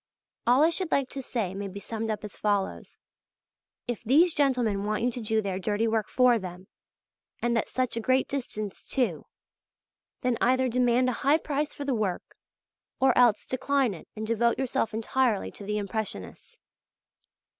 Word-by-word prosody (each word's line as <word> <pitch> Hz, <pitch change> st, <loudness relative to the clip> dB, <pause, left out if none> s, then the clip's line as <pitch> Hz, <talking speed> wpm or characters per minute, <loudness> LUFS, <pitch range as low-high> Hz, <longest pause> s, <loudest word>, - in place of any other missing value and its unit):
All 250 Hz, +5 st, +6 dB
I 325 Hz, -, +5 dB
should 360 Hz, -1 st, -1 dB
like 275 Hz, -2 st, +1 dB
to 275 Hz, -, -5 dB
say 225 Hz, -7 st, -3 dB
may 200 Hz, +1 st, -4 dB
be 195 Hz, +1 st, -7 dB
summed 225 Hz, +2 st, -4 dB
up 215 Hz, -1 st, -3 dB
as 210 Hz, -, -7 dB
follows: 205 Hz, -2 st, -1 dB, 0.9 s
If 240 Hz, -2 st, -4 dB
these 310 Hz, +9 st, +5 dB
gentlemen 245 Hz, -8 st, +1 dB
want 215 Hz, +2 st, -1 dB
you 245 Hz, -, +2 dB
to 245 Hz, -, -6 dB
do 220 Hz, 0 st, 0 dB
their 190 Hz, -2 st, -2 dB
dirty 210 Hz, +3 st, 0 dB
work 220 Hz, -1 st, 0 dB
for 250 Hz, -2 st, +4 dB
them, 185 Hz, -1 st, -8 dB, 0.7 s
and 240 Hz, 0 st, 0 dB
at 230 Hz, -, 0 dB
such 255 Hz, -2 st, -1 dB
a -, -, -1 dB
great 255 Hz, +3 st, +2 dB
distance 215 Hz, -7 st, -5 dB
too, 230 Hz, -, -1 dB, 0.9 s
then 250 Hz, -3 st, 0 dB
either 255 Hz, +1 st, +3 dB
demand 250 Hz, +1 st, +2 dB
a 245 Hz, -, -4 dB
high 285 Hz, +4 st, +4 dB
price 295 Hz, -1 st, -2 dB
for 285 Hz, -, -5 dB
the 275 Hz, -, 0 dB
work, 205 Hz, -6 st, -2 dB, 0.6 s
or 265 Hz, -2 st, +4 dB
else 240 Hz, -4 st, +4 dB
decline 265 Hz, -2 st, +1 dB
it 165 Hz, -, -11 dB
and 220 Hz, 0 st, -4 dB
devote 230 Hz, +1 st, +1 dB
yourself 255 Hz, -4 st, 0 dB
entirely 225 Hz, 0 st, 0 dB
to -, -, -11 dB
the 210 Hz, +1 st, -2 dB
Impressionists. 200 Hz, -, -5 dB
235 Hz, 175 wpm, -27 LUFS, 210-255 Hz, 0.9 s, All